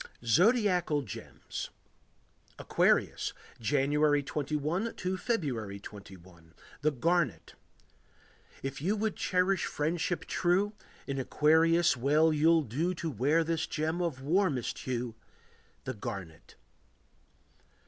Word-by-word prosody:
ZODIACAL 180 - +3
GEMS 105 - -7 0.9
Aquarius. - - +1 0.3
January 145 +4 +2
21 150 +8 -2
to 185 +1 -2
February 135 - -2
21. 90 -5 -13 0.3
The 155 - +3
Garnet. 145 - 0 1.1
If 135 0 -4
you 195 +7 +1
would 215 -1 -1
cherish 185 0 +1
friendship 165 +3 -1
true, 190 +4 +1 0.3
In 135 -1 -3
Aquarius 160 +5 +4
well 150 +5 +3
you'll 160 +2 +4
do 155 - -1
To 165 -1 -3
wear 145 +7 +2
this 160 -1 -1
gem 160 +3 -1
of 150 -7 -2
warmest 155 - +1
hue— 125 -2 -3 0.7
The - - -4
garnet. 100 -7 -8
150 Hz, 100 wpm, -30 LUFS, 130-175 Hz, 1.1 s, Aquarius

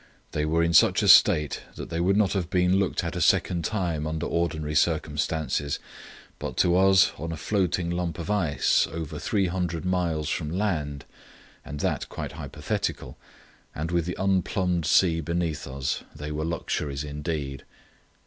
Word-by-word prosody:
They 75 0 -1
were 80 +2 +2
in 85 0 +1
such - - +5
a - - +1
state 75 -1 +6
that - - -8
they 85 - -2
would 95 +3 +2
not 105 -3 +3
have 90 -4 -2
been 90 0 +3
looked 95 - 0
at - - -4
a - - -2
second 85 -2 +2
time 85 -6 -1
under 80 +2 -3
ordinary 80 -3 -1
circumstances, 75 -2 0 0.6
but 65 - -5
to 85 0 +3
us 95 0 +5
on 80 +3 -4
a 80 - -4
floating 90 -1 0
lump 85 -2 -2
of 85 +3 -4
ice, 90 -9 +2
over 80 -2 -6
three 100 -3 0
hundred 90 -3 -2
miles 85 -5 0
from 75 0 -2
land, 80 -7 -2 0.6
and 75 0 -6
that - - -1
quite - - -5
hypothetical, - - -4 0.6
and 80 +3 -3
with 85 -2 +1
the 90 - -4
unplumbed 95 -2 0
sea 85 -2 +4
beneath 85 -1 -2
us, 65 0 -3
they 75 0 -6
were 75 +1 -2
luxuries 75 -4 -3
indeed. 75 -2 -4
85 Hz, 165 wpm, -26 LUFS, 75-90 Hz, 0.6 s, state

